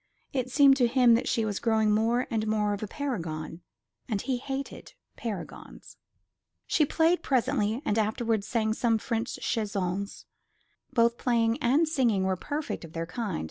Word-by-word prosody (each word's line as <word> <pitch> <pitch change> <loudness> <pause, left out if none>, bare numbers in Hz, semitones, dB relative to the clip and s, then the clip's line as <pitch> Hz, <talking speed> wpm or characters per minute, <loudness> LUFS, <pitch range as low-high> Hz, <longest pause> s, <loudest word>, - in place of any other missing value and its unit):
It 255 -2 -1
seemed 275 0 +6
to 245 -3 +4
him 245 -1 +5
that 230 - +1
she 225 -3 +1
was 205 -2 -2
growing 220 -2 +2
more 230 +4 +2
and 220 -1 -1
more 210 -1 +1
of 200 - -5
a 215 - -3
paragon; 170 - -4 0.5
and 210 -4 0
he 255 +4 -1
hated 270 +2 -6 0.2
paragons. 205 -7 -8 0.7
She 305 -3 +2
played 330 +4 +2
presently, 255 -2 0
and 220 -5 +1
afterwards 220 -1 0
sang 220 -2 0
some 230 0 +1
French 230 +2 -3
chansons. 200 -3 -2 0.7
Both 235 -2 +2
playing 230 -2 +1
and 280 +7 +3
singing 240 -10 +1
were 190 0 +1
perfect 290 - -4
of 165 -1 -11
their 165 0 -3
kind. 195 0 -3
230 Hz, 160 wpm, -28 LUFS, 210-255 Hz, 0.7 s, seemed